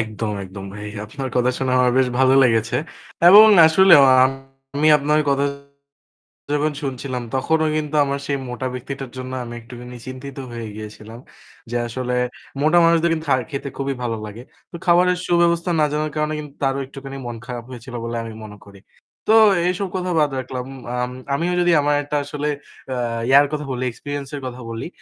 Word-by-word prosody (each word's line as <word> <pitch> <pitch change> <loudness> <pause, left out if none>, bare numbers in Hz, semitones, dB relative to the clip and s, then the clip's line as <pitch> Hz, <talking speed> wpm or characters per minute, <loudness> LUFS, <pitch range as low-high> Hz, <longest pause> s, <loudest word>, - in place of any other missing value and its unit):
একদম, 110 0 -3
একদম 95 +1 -9
ভাই। 105 0 -7 0.2
আপনার 130 +5 -6
কথা 125 0 +3
শোনা 130 -1 -1
আমার 125 -1 +4
বেশ 130 -1 +3
ভালো 130 0 +5
লেগেছে। 115 -3 +2 0.5
এবং 210 +4 +10 0.2
আসলেও 170 -1 +7 0.7
আমি 150 +2 +3
আপনার 150 +2 +2
কথা 140 0 +2 1.1
যখন 150 +1 +1
শুনছিলাম 130 -2 -4
তখনও 160 +4 +1
কিন্তু 150 0 -3
আমার 140 0 -2
সেই 140 - 0
মোটা 125 +1 -4
ব্যক্তিটার 135 +1 -6
জন্য 130 0 -6
আমি 120 0 -8
একটুখানি 125 +1 -10
চিন্তিত 130 +1 -8
হয়ে 115 -1 -6
গিয়েছিলাম। 110 +1 -10 0.5
যে 120 - 0
আসলে 125 +1 -3 0.5
মোটা 155 +4 +4
মানুষদের 170 0 +3
কিন্তু 160 -1 -4
খা 135 - +5 0.2
খেতে 140 0 -4
খুবই 135 0 -2
ভালো 115 -2 -2
লাগে। 105 +3 -9 0.3
তো - - -9
খাবারের 180 +1 +4
সুব্যবস্থা 170 0 +2
না 155 - +4
জানার 150 0 -2
কারণে 150 0 -1
কিন্তু 150 -2 -9
তারও 135 0 +1
একটুখানি 135 0 -9
মন 120 - -5
খারাপ 120 -2 -6
হয়েছিল 125 0 -10
বলে 115 0 -4
আমি 115 -1 -7
মনে 105 -1 -10
করি। 100 -1 -15 0.5
তো - - +6 0.3
এইসব 190 +2 -1
কথা 180 -1 -2
বাদ 150 -1 +3
রাখলাম। 130 0 -5 0.4
আম 125 - -3 0.2
আমিও 170 +5 -1
যদি 175 0 +3
আমার 145 0 +2
একটা 145 +1 -4
আসলে 145 +1 -4 0.5
আ - - -3 0.3
ইয়ার 140 +2 +7
কথা 150 0 -3
বলি, 130 0 -3
experience 145 +2 -6
এর 140 - -6
কথা 125 0 -8
বলি। 115 +4 -5
135 Hz, 175 wpm, -21 LUFS, 120-150 Hz, 1.1 s, এবং